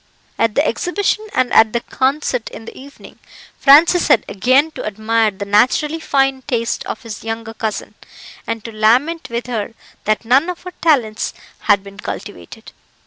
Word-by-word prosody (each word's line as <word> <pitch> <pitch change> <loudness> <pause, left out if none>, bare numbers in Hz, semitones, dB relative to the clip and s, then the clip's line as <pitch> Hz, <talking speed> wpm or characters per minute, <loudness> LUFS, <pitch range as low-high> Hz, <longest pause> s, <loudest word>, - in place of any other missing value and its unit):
At 230 -2 +1
the 290 - +3
Exhibition 405 +4 -1
and 255 -1 +1
at 220 -1 +5
the 235 - +1
concert 260 -1 -1
in 225 - -11
the - - -10
evening, 280 +2 -14 0.4
Francis 320 +5 +6
had - - +4
again 255 +10 +2
to - - -7
admire 220 +1 +1
the 200 0 -7
naturally 255 +10 +2
fine 270 -3 +1
taste 230 -4 -1
of - - -6
his 220 -4 -8
younger 225 0 -5
cousin, 220 -1 -4 0.5
and 230 -2 -3
to 230 - -6
lament 250 +11 +1
with 235 +1 -3
her 225 -2 -4 0.3
that 215 +2 0
none 270 +9 +3
of 360 - -6
her 360 0 -8
talents 250 -10 +1 0.3
had 200 -1 +5
been 200 0 -13
cultivated. 95 -3 -8
235 Hz, 165 wpm, -18 LUFS, 215-280 Hz, 0.5 s, Francis